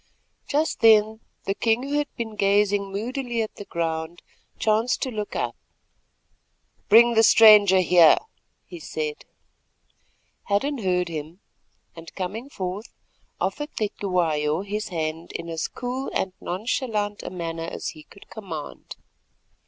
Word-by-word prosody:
Just 305 +3 0
then 220 -1 +5 0.2
the 195 - -1
king, 225 +4 +1
who 285 +2 -1
had 295 - -1
been 220 -2 -5
gazing 200 0 +2
moodily 240 +4 -3
at 215 - -8
the 205 - -8
ground, 165 0 -4 0.3
chanced 220 +3 +1
to 260 - -3
look 210 -2 -5
up. - - -2 1.3
"Bring 235 +3 +7
the 225 - +5
stranger 210 -4 +7
here," 175 -3 +6 0.5
he 175 - -10
said. 155 -1 -5 1.2
Hadden 260 +8 0
heard 180 -3 0
him, 160 +2 -7 0.6
and 165 0 -12
coming 210 +8 -5
forward 195 -1 -5 0.5
offered 295 0 -3
Cetywayo 175 -7 0
his 210 +2 -4
hand 160 -1 -4
in 170 - -6
as 165 -1 -2
cool 255 +2 -5
and 190 -1 -1
nonchalant 210 +1 -2
a - - -6
manner 165 -2 -5
as - - -4
he 155 - -11
could 200 +6 -17
command. 175 -9 -8
200 Hz, 130 wpm, -24 LUFS, 170-225 Hz, 1.3 s, Bring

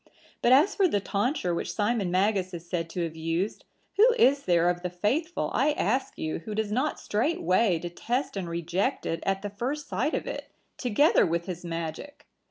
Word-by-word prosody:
But 240 - +3
as 290 +10 +6
for 390 - +3
the 205 - +1
tonsure 200 - -1
which 170 - -3
Simon 210 -2 +1
Magus 185 0 +1
is 170 0 -9
said 170 -2 -2
to 175 +1 -2
have 165 -1 -4
used, 165 +5 -2 0.3
who 465 +4 +6
is 280 - +4
there 175 -1 +3
of 175 0 0
the 180 - -2
faithful, 255 - -1
I 295 +3 +3
ask 260 -1 -1
you, 155 - -3
who 210 +6 -6
does 215 -1 -1
not 260 +7 0
straightway 220 - +1
detest 205 - -3
and 185 -3 -3
reject 170 +3 -1
it 165 0 -2
at 195 0 0
the 205 - -4
first 265 +8 -3
sight - - 0
of - - -3
it, - - -6 0.3
together 255 +5 +3
with 170 0 0
his 180 -2 -6
magic? 165 - -6
200 Hz, 190 wpm, -27 LUFS, 175-260 Hz, 0.3 s, as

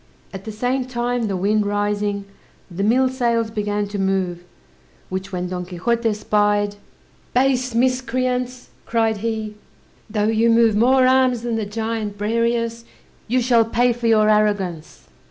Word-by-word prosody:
At 195 0 -8
the 220 - -5
same 250 +4 -1
time, 245 -2 -2
the 195 -2 -2
wind 210 +3 +1
rising, 205 0 -1 0.5
the 175 +3 -4
mill 245 +6 +3
sails 235 -3 0
began 205 -1 -2
to 205 -1 -4
move, 190 -2 -1 0.7
which 190 +1 -5
when 180 -1 -3
Don 180 -1 -4
Quixote 225 +6 -1
spied, 205 -1 +1 0.6
"Base 255 -1 +2
miscreants," 255 0 -1 0.2
cried 225 -2 +1
he, 220 0 -3 0.6
"though 210 -1 -1
you 225 +1 +2
move 230 -2 +4
more 255 +4 +4
arms 255 -2 +3
than 235 -1 -1
the 220 -2 -2
giant 220 -1 -3
Briareus, 230 +2 -1 0.4
you 250 +2 +1
shall 235 -2 +4
pay 240 +2 +2
for 235 0 -3
your 215 -1 +4
arrogance." 205 -6 0
225 Hz, 145 wpm, -21 LUFS, 205-240 Hz, 0.7 s, move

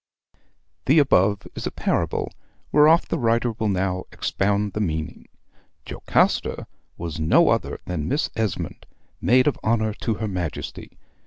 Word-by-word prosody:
The 140 +5 +5
above 100 -8 +3
is - - -4
a - - -4
parable, - - -1 0.4
whereof 155 +3 +5
the 165 - -2
writer 115 0 +1
will 110 -1 -2
now 95 -1 -1
expound 100 0 -1
the - - -3
meaning. 80 -6 -3 0.6
Jocasta - - 0 0.3
was 85 -2 -5
no 80 0 +4
other - - 0
than 80 -4 -3
Miss 145 - 0
Esmond, 110 -6 -3 0.3
Maid 130 +1 +4
of 150 - 0
Honor 110 -1 +1
to 115 - 0
her 110 +1 -3
Majesty. 90 -6 -5
105 Hz, 140 wpm, -23 LUFS, 90-120 Hz, 0.6 s, The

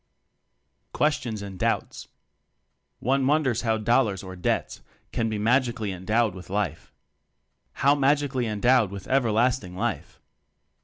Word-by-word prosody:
Questions 120 -8 0
and 95 -2 -8
Doubts. - - -2 0.9
One 135 +2 +1
wonders 135 -6 +2
how 110 -2 +1
"dollars" 110 -3 +1
or 95 -1 -8
"debts" 90 - -2 0.3
can 115 -1 -1
be 110 - -2
magically 120 -1 +1
endowed 105 +4 0
with 90 0 -11
life? 105 +2 -3 0.9
How 140 - +7
magically 140 -3 +1
endowed 110 +1 +3
with 100 0 -8
"ever 130 -4 +2
lasting 115 -4 +1
life?" 95 - -3
115 Hz, 120 wpm, -25 LUFS, 100-130 Hz, 0.9 s, How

